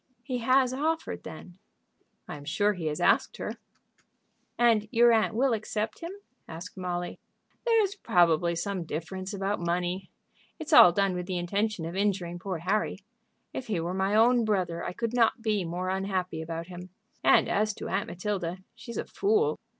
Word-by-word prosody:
"He 255 -2 -3
has 255 +2 +3
offered, 320 +4 -2
then?" 175 +3 -10 0.7
"I - - -6
am 145 - -10
sure 205 +7 +1
he 175 -5 -4
has 150 -1 -2
asked - - +2
her." - - -5 1.0
"And 225 -3 +3
your 235 +2 +5
aunt 220 -1 +2
will 255 +1 +2
accept 215 0 -3
him?" 335 - -6 0.4
asked 170 +4 -8
Molly. 175 -1 -4 0.5
"There's 440 -4 +3
probably 170 - +2
some 190 +1 -2
difference 185 +5 -5
about 200 0 -2
money. 175 +2 -2 0.5
It's 315 0 -4
all 180 - +10
done 195 +1 +1
with 180 0 -4
the 185 -2 -2
intention 200 +1 -1
of 170 +2 -5
injuring 190 -3 -1
poor 185 -1 -3
Harry. 190 +6 -1 0.6
If 260 - -5
he 205 -6 -1
were 170 +2 -2
my 190 +2 0
own 235 +2 +5
brother 185 -6 -1
I - - -4
could 230 +3 -3
not 235 -1 +2
be 210 -4 +1
more 175 +2 -3
unhappy 190 -3 -2
about 165 +1 -5
him. 180 +1 -9 0.3
And - - +5
as 215 +1 +1
to - - -6
Aunt 195 +2 -1
Matilda, 180 -1 -3 0.2
she's 235 +1 -9
a - - -2
fool. 435 +2 +1
195 Hz, 175 wpm, -28 LUFS, 175-225 Hz, 1.0 s, all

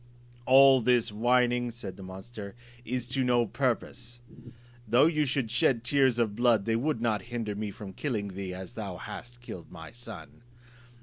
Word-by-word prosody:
"All 135 0 +7
this 120 -1 +2
whining," 120 +2 +2
said 110 -5 -7
the 95 - -12
monster, 100 +3 -9 0.3
"is 125 0 -3
to 130 +1 0
no 120 -1 +3
purpose; 120 -1 -3 0.7
though 120 +6 +5
you 155 -2 +2
should 130 -4 -1
shed 120 -1 +2
tears 130 -2 +3
of 110 -4 0
blood, 115 -3 +3
they 115 - +1
should 125 +2 0
not 110 -4 +1
hinder 115 -3 -3
me 105 +1 -4
from 100 -1 -9
killing 105 -5 -3
thee, 95 0 -5
as 95 +3 -8
thou 100 -6 -5
hast 120 +6 -9
killed 90 -7 -9
my 80 -3 -10
son." 115 -1 -11
120 Hz, 170 wpm, -29 LUFS, 105-125 Hz, 0.7 s, All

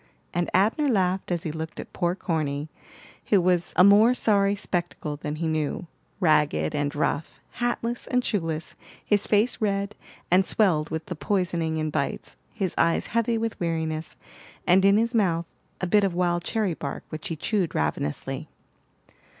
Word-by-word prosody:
and 175 0 0
Abner 220 - +3
laughed 190 -6 +1
as 170 -1 -1
he 155 - -2
looked 160 0 -6
at - - -8
poor 175 0 0
Corny, 155 -5 -2 0.6
who 205 - +5
was 175 -1 +1
a - - +7
more 210 +5 +6
sorry 200 -4 +2
spectacle 175 -6 -3
than 150 +1 -5
he 165 +1 -2
knew, 155 +2 -1 0.3
ragged 150 - +2
and 145 0 -1
rough, 150 +1 -1 0.2
hatless 240 0 -1
and 250 -2 +1
shoeless, 165 -5 -2 0.3
his 205 -1 +1
face 220 +4 +2
red 200 0 0 0.4
and 185 +2 +6
swelled 175 -7 +2
with 160 0 -4
the 180 - -5
poisoning 170 -3 -1
and 155 -1 -1
bites, 140 -2 -3 0.2
his 195 -6 -2
eyes 165 - +2
heavy 230 0 +2
with 225 0 -3
weariness, 160 -2 -2 0.5
and 185 +2 +5
in 200 +1 +6
his 230 +2 +1
mouth 170 -7 +2 0.4
a - - +1
bit 205 +3 +3
of 190 -3 0
wild 175 -1 +1
cherry 215 -4 0
bark 140 -3 -5
which 155 0 -6
he 165 - -3
chewed 185 +2 -1
ravenously. 75 -1 -2
175 Hz, 165 wpm, -26 LUFS, 160-205 Hz, 0.6 s, a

